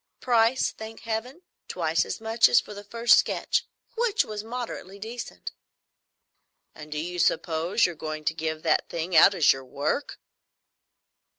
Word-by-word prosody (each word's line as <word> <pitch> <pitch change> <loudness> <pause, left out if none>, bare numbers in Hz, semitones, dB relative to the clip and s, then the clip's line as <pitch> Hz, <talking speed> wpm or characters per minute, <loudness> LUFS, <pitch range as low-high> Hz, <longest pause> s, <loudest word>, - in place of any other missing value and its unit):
Price, 240 +1 +2
thank 220 0 -10
Heaven, 235 +9 -4 0.2
twice 165 -2 0
as - - -5
much 225 +1 +3
as 240 - +6
for - - -9
the 205 0 -9
first 230 +3 +4
sketch, - - -1 0.3
which 470 -2 +1
was 210 -1 -6
moderately 225 -5 -6
decent." 230 +4 -7 1.2
"And 150 0 -12
do 150 - -4
you 175 +3 -4
suppose 165 +5 +1
you're 175 - -1
going 155 -1 -6
to 160 - +1
give 160 0 -4
that - - +1
thing 170 +1 -3
out 195 +5 +7
as 160 - +5
your 135 - -9
work?" 140 - -3
200 Hz, 155 wpm, -26 LUFS, 160-230 Hz, 1.2 s, out